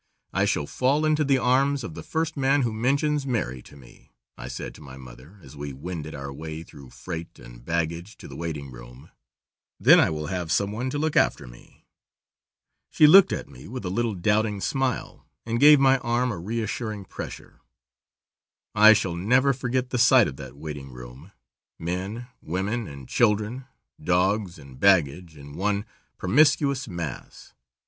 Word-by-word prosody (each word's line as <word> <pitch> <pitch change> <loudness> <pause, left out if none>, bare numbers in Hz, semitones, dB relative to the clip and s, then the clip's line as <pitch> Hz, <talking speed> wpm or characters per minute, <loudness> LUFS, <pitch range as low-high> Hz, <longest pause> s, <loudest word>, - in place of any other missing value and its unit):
I - - +2
shall 70 - 0
fall 140 - +1
into 155 0 +2
the 135 -2 +3
arms 135 +2 +2
of 85 - -6
the - - -8
first 160 0 -2
man 135 0 +2
who 115 -2 -1
mentions 140 +5 0
marry 65 - -2
to 70 - -16
me," - - -18 0.2
I - - -8
said - - -6
to - - -15
my 65 -3 -11
mother 65 +8 -14
as 65 +1 -13
we 70 -1 -6
wended 80 +2 -7
our 70 0 -7
way 80 +2 -7
through 70 -5 -14
freight 85 +4 -8
and - - -14
baggage 85 - -3
to - - -11
the - - -10
waiting 75 -5 -5
room, - - -13 0.7
"then - - +7
I - - +4
will 75 -1 -4
have 85 0 -4
some 100 +3 +1
one 120 +5 -3
to 145 - -3
look 155 +1 -1
after - - +2
me." - - -17 1.0
She 155 - +5
looked 190 +6 +8
at - - -4
me 65 - -13
with 125 -2 -7
a 90 - -2
little 115 +1 -1
doubting 105 +2 0
smile, 130 +3 -3 0.2
and 115 +1 -1
gave 150 +1 +8
my 135 -1 +4
arm 120 +1 0
a 100 - -5
reassuring 110 +1 -4
pressure. - - -9 1.1
I 110 +1 +8
shall 95 -5 -1
never 125 +10 +3
forget 125 0 -2
the 125 - -1
sight 120 0 +6
of 70 - -7
that 65 0 -10
waiting 75 -2 -7
room. 60 +7 -12 0.5
Men, 95 +8 -4 0.2
women, 100 +7 -3
and 70 -2 -10
children, 115 +3 +1 0.4
dogs 95 +1 +1
and 70 -2 -14
baggage, 85 -3 +2
in 70 0 -12
one 100 +4 -1 0.3
promiscuous 140 +4 +2
mass. 85 - -7
100 Hz, 170 wpm, -25 LUFS, 75-125 Hz, 1.1 s, looked